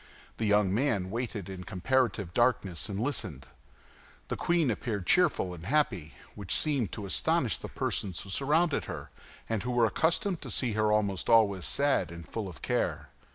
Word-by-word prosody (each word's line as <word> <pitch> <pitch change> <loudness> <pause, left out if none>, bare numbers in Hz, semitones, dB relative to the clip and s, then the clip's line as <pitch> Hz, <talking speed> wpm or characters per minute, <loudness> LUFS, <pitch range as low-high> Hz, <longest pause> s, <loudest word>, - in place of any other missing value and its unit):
The 110 - -1
young 105 -2 +3
man 105 -6 0
waited 115 -4 -4
in 95 -1 -7
comparative 105 0 0
darkness 105 -8 +1
and 100 -1 -3
listened. 105 - -2 0.8
The - - -1
queen 170 -6 +1
appeared 105 -3 -3
cheerful 155 - +3
and 85 +1 -9
happy, 115 - 0 0.2
which 100 -4 -1
seemed 140 - +2
to 105 - -5
astonish 95 - +1
the - - -7
persons 95 -4 -1
who 100 - -8
surrounded 150 - +1
her - - -7 0.4
and 110 -3 -1
who 120 - -4
were 120 -1 +3
accustomed 165 - +1
to - - -7
see 120 -4 0
her 110 0 +2
almost 100 -3 0
always 105 -5 +4
sad 140 0 +2
and 85 -1 -9
full 110 -3 -4
of 90 - -13
care. - - -1
110 Hz, 170 wpm, -29 LUFS, 95-130 Hz, 0.8 s, always